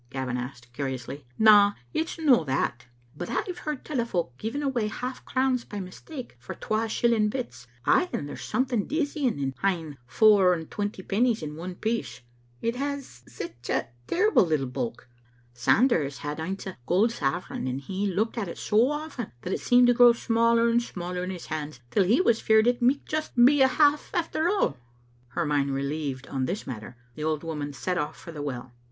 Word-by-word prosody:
Gavin 130 -2 -3
asked, 120 -1 -7
curiously. 130 0 -5
"Na, 205 -2 +7 0.2
it's 325 - -2
no 280 - +4
that. 125 -2 -1 0.3
But 175 +4 -5
I've 360 -2 -2
heard 300 -3 -5
tell 280 -6 -1
o' - - -1
folk 170 - -2
giving 235 +7 -3
away 250 -6 0
half 250 +4 -5
crowns' 255 -2 +1
by 205 - -7
mistake 235 - -8
for 120 - -8
twa 220 +1 -1
shilling 220 -2 +2
bits; 235 - -5 0.2
ay, 360 - +4
and 145 - -3
there's 145 - -7
something 240 -2 0
dizzying 290 - 0
in 135 -1 -2
ha'en 165 -7 -1
fower 200 - +5
and 160 -2 -8
twenty 205 -2 -3
pennies 225 -1 +1
in 150 0 -5
one 175 +3 -6
piece; 225 +4 -3 0.4
it 230 +1 0
has 280 - -4
sic 115 -1 -7 0.5
terrible 425 - +4
little 155 -6 0
bulk. 125 -2 -4 0.5
Sanders 145 - +2
had 150 +1 -5
aince 190 +5 -4
a 190 -7 -7
gold 205 - +3
sovereign, 165 - -2
and 130 +2 -3
he 195 +8 -2
looked 215 +5 -1
at 205 - -2
it 170 - -7
so 225 +4 +3
often 295 -6 -4
that 185 - -2
it - - -1
seemed 245 0 +5
to 245 - +5
grow 240 0 +7
smaller 230 0 +3
and 235 +1 +3
smaller 180 -5 -5
in 180 - -3
his 180 -2 -6
hand 150 -3 -5
till 190 - +3
he 225 +9 +4
was 235 -11 +3
feared 220 0 +4
it 245 +1 +2
micht 260 +4 +2
just 310 0 -3
be 260 +4 +6
a 265 - +7
half 295 +2 +3
affdr 330 -1 0
all." 370 - +1 0.5
Her 140 +8 -2
/*iind 145 -2 +1
relieved 140 -1 -3
on 135 -2 -2
this 200 - -3
matter, 120 0 -7 0.2
the 150 - -6
old 155 0 -1
woman 150 -3 -4
set 175 +7 -2
off 150 0 -3
for 170 - -10
the 150 -3 -7
well. 130 -3 -5
195 Hz, 195 wpm, -27 LUFS, 145-245 Hz, 0.5 s, Na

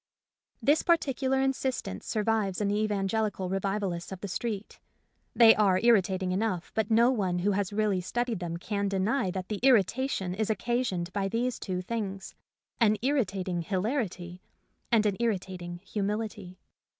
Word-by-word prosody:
This 295 +3 +4
particular 270 -5 +1
instance 265 - -2
survives 215 -3 0
in 205 -1 0
the 205 +1 +1
evangelical 205 -2 -1
revivalists 195 -2 -2
of 190 - -6
the 200 - -4
street. 210 +2 -4 0.6
They 225 -2 +8
are 195 -3 +3
irritating 190 -5 +3
enough, 185 -2 -1
but 220 -1 0
no 235 +3 +5
one 190 -8 0
who 190 +4 +1
has 200 -1 -1
really 205 -3 +1
studied 235 +3 -2
them 170 -2 -4
can 200 +3 -2
deny 195 +3 0
that 185 0 -4
the 210 -2 -3
irrita 260 +1 +3
tion 185 -8 -2
is 215 +3 -2
occasioned 215 -5 -1
by 200 -1 0
these 235 +4 -1
two 185 -2 -3
things, 195 -2 -4 0.5
an 215 -3 +4
irritating 195 -10 0
hilarity 185 - -2 0.5
and 220 -2 +4
an 200 -2 +1
irritating 185 -6 -2
humility. 205 -2 -3
205 Hz, 150 wpm, -29 LUFS, 185-230 Hz, 0.6 s, They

